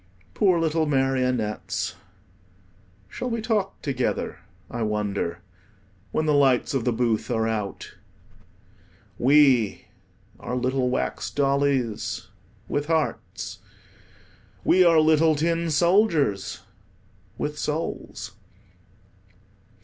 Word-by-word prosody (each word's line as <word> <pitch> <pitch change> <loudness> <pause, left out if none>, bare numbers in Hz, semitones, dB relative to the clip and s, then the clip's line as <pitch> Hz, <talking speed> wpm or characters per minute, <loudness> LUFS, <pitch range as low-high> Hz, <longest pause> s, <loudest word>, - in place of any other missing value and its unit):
Poor 185 -4 +3
little 160 -1 +1
marionettes, 130 -5 0 1.1
shall 250 - -5
we 230 -1 -2
talk 215 -3 -1
together, 130 -3 -2 0.3
I 120 - -5
wonder, 100 -5 -2 0.7
when 155 - 0
the 150 - +2
lights 135 -3 +3
of 130 -4 -1
the 125 - +2
booth 115 -2 0
are 110 -2 +1
out? 105 -3 -4 1.3
We 130 -5 +4 0.5
are 125 - -4
little 130 0 0
wax 125 - -2
dollies 135 -5 0 0.4
with 145 0 -2
hearts. 160 -2 -2 1.0
We 185 +1 +5
are 165 -2 +6
little 155 0 +4
tin 165 +2 0
soldiers 160 - +2 0.8
with 150 0 -3
souls. 155 +2 -4
140 Hz, 95 wpm, -25 LUFS, 120-160 Hz, 1.3 s, are